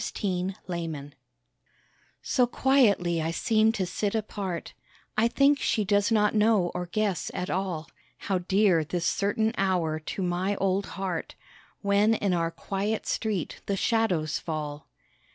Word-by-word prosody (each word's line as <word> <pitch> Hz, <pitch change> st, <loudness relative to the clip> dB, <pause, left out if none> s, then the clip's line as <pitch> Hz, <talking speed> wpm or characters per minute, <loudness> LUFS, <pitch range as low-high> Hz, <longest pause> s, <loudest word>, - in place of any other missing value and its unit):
THE 185 Hz, -2 st, -1 dB
MOTHER 165 Hz, -5 st, -4 dB, 1.1 s
So 250 Hz, -2 st, +2 dB
quietly 210 Hz, -11 st, +3 dB
I 160 Hz, -, -1 dB
seem 220 Hz, +5 st, +2 dB
to 190 Hz, -4 st, -1 dB
sit 200 Hz, +4 st, -2 dB
apart; 200 Hz, -5 st, -4 dB, 0.4 s
I 220 Hz, +2 st, +4 dB
think 280 Hz, +4 st, +3 dB
she 215 Hz, -, +1 dB
does 205 Hz, +2 st, +2 dB
not 210 Hz, -2 st, +3 dB
know 210 Hz, -4 st, +3 dB
or 180 Hz, 0 st, -3 dB
guess 200 Hz, 0 st, -1 dB
at 180 Hz, -, -3 dB
all, 180 Hz, -4 st, -2 dB, 0.3 s
How 190 Hz, -2 st, -1 dB
dear 185 Hz, -2 st, +3 dB
this 170 Hz, +3 st, -3 dB
certain 220 Hz, +5 st, +1 dB
hour 175 Hz, -5 st, +1 dB
to 170 Hz, +4 st, -4 dB
my 180 Hz, +3 st, 0 dB
old 195 Hz, 0 st, 0 dB
heart, 185 Hz, -4 st, -3 dB, 0.5 s
When 205 Hz, +2 st, +3 dB
in 200 Hz, -4 st, 0 dB
our 165 Hz, -1 st, +1 dB
quiet 200 Hz, +5 st, -3 dB
street 210 Hz, -7 st, -2 dB
the 200 Hz, -, 0 dB
shadows 185 Hz, -10 st, +1 dB
fall. 150 Hz, -2 st, -5 dB
195 Hz, 140 wpm, -27 LUFS, 175-215 Hz, 1.1 s, I